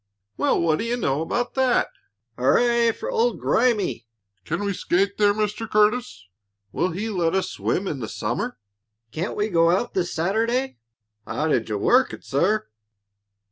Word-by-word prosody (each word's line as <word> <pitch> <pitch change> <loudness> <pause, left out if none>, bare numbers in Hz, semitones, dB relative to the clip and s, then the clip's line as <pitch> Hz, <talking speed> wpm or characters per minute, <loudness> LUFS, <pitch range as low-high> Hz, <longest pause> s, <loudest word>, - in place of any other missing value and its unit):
"Well, - - +1
what 160 -2 +2
do - - -1
you 240 +1 -1
know 140 - 0
about 240 +9 -2
that!" 260 -2 +2 0.5
"Hurrah 235 - +3
for 475 - -6
old 480 0 +1
Grimey!" 195 - +1 0.4
"Can 170 +6 -2
we 200 - 0
skate 195 +3 0
there, 205 -1 +5
Mr. 210 +1 -2
Curtis?" 215 - +1 0.5
"Will 185 - 0
he 190 +6 -4
let 175 -3 0
us 190 - 0
swim 190 +2 -1
in 145 - -3
the 110 - -5
summer?" 120 - -3 0.5
"Can't 175 - -3
we 210 +1 0
go 165 -4 +3
out 185 +7 0
this 175 -2 -1
Saturday?" 230 +10 0 0.5
"How 145 +8 -1
did 115 -7 0
you 105 - -1
work 250 - +3
it, - - -9
sir?" 180 - 0
200 Hz, 165 wpm, -23 LUFS, 165-235 Hz, 0.5 s, there